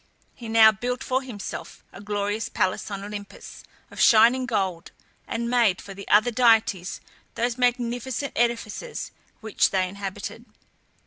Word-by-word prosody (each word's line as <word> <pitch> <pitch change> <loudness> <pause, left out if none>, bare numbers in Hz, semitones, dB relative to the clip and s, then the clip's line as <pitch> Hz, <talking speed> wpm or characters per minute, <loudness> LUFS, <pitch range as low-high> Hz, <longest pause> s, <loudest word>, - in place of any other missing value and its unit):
He 235 -3 -9
now 220 -1 +7
built 245 +4 -4
for 260 +1 0
himself 240 -7 -8
a - - -11
glorious 205 +1 -2
palace 185 +2 -1
on 200 -1 -5
Olympus, 205 0 -9 0.3
of - - -5
shining 245 +3 +5
gold, 190 -7 -2 0.4
and 235 0 -3
made 235 -6 +2
for 195 - -9
the 200 +1 -10
other 215 +4 +4
deities 225 -6 +2 0.3
those 235 0 -1
magnificent 245 +2 -1
edifices 235 - -2 0.3
which 220 -2 +1
they 185 -1 0
inhabited. 195 0 -7
220 Hz, 135 wpm, -25 LUFS, 200-245 Hz, 0.4 s, now